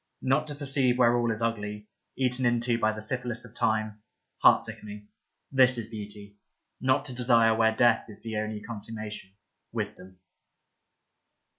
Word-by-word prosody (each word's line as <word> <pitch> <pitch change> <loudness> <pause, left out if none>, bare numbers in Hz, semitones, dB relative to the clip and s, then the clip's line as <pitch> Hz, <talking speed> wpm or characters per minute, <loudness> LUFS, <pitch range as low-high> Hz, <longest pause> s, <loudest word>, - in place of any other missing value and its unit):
Not 135 +4 +2
to 145 - -5
per 145 0 -7
ceive 130 -2 +2
where 120 -1 +4
all 120 -1 +1
is 110 +1 -3
ugly, 105 -2 -3 0.3
eaten 130 0 +1
into 120 -1 +2
by 110 -1 +2
the 110 0 -7
syphilis 120 0 -4
of 115 - -15
time, 110 -2 -1 0.4
heart - - +7
sickening 105 0 -7 0.2
— - - -52
this 130 -2 +5
is 115 -1 -5
beauty; 105 -2 -9 0.4
not 130 +2 +1
to 130 - -3
desire 120 -2 +4
where 110 0 +2
death 120 -1 +3
is 105 - -7
the 110 -2 -4
only 105 0 -3
con 115 -3 -7
summation 105 -3 -8 0.2
— - - -53
wisdom 95 0 -5
115 Hz, 170 wpm, -28 LUFS, 105-125 Hz, 0.4 s, heart